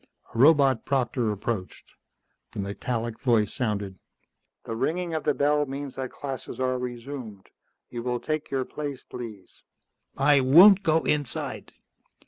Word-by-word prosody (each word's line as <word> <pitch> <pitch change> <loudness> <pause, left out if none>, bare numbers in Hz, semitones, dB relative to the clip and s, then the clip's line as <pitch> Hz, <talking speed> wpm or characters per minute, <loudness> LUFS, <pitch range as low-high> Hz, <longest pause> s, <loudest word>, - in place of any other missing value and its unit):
A - - -7
robot 140 -3 +5
proctor 125 -4 0
approached. 105 -2 -5 0.6
The - - -6
metallic 115 +3 -3
voice 115 -5 +2
sounded. 100 -5 -2 0.6
"The 115 - -5
ringing 170 +7 -1
of 160 - -3
the 150 - +2
bell 150 0 +2
means 140 0 -6
that 130 -1 -5
classes 135 -2 -7
are 130 -1 0
resumed. 120 -4 -7 0.4
You 120 - -5
will 125 0 -2
take 155 +2 -3
your 135 -2 -1
place, 145 -3 -6
please." 110 -6 -10 0.6
"I 145 0 +5
won't 180 +10 +8
go 160 -4 +2
inside." 145 -4 -2
130 Hz, 135 wpm, -26 LUFS, 115-145 Hz, 0.6 s, won't